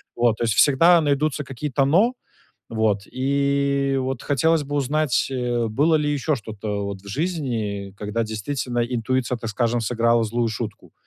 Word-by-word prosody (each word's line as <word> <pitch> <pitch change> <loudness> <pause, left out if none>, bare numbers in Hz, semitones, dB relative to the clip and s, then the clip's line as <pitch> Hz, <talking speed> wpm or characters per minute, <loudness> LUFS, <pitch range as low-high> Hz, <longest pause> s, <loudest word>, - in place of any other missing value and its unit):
вот. 120 -2 +2
То - - -2
есть 110 -3 +1
всегда 165 +5 +6
найдутся 145 -1 0
какие-то 135 0 -1
"но". 195 - +3 0.6
Вот, 110 -3 0
и 140 +1 0
вот 130 -1 -3
хотелось 155 +3 +2
бы 145 +1 -4
узнать, 145 0 +1
э, 120 -2 -1
было 145 +9 +2
ли 150 -1 +1
еще 145 +2 0
что-то 105 -3 -5
вот 100 -1 -5
в 100 - -15
жизни, 110 - -3
когда 105 +2 -2
действительно 120 +3 -3
интуиция, 125 +1 -1
так 115 -1 -5
скажем, 120 +2 0
сыграла 115 0 +2
злую 115 +2 0
шутку. 110 -1 -6
125 Hz, 155 wpm, -23 LUFS, 110-140 Hz, 0.6 s, всегда